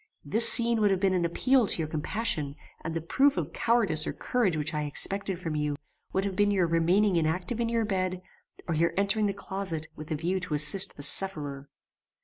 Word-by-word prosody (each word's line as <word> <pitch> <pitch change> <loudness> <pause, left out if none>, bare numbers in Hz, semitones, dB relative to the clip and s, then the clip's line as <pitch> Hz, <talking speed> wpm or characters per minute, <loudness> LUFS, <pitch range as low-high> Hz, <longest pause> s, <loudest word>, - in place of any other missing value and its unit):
This 220 +11 +5
scene 235 -1 +3
would 205 - +3
have 190 -2 0
been 190 -1 +1
an 175 -2 0
appeal 250 +7 +2
to - - +3
your 160 -2 -3
compassion; 155 -2 -2 0.3
and 160 0 -5
the 165 - -2
proof 270 - +1
of 165 -1 -4
cowardice 210 -10 +1
or - - -3
courage 220 -10 -1
which 155 +2 -3
I 150 0 -2
expected 195 +5 -2
from 165 -3 -5
you, 150 -1 -2 0.4
would 190 +1 -1
have 195 -2 -4
been 205 +2 +2
your 190 -3 +1
remaining 175 +4 +1
inactive 175 +8 -2
in 230 -1 -1
your 230 -1 0
bed, 185 -2 -3 0.4
or 170 - -1
your 165 +2 0
entering 205 +2 +1
the - - -1
closet 190 -5 -2
with 155 0 -10
a 155 - -2
view 175 +5 -2
to 175 -4 -4
assist 150 +6 +4
the 145 - -5
sufferer. 145 -5 +2
180 Hz, 210 wpm, -27 LUFS, 155-205 Hz, 0.4 s, This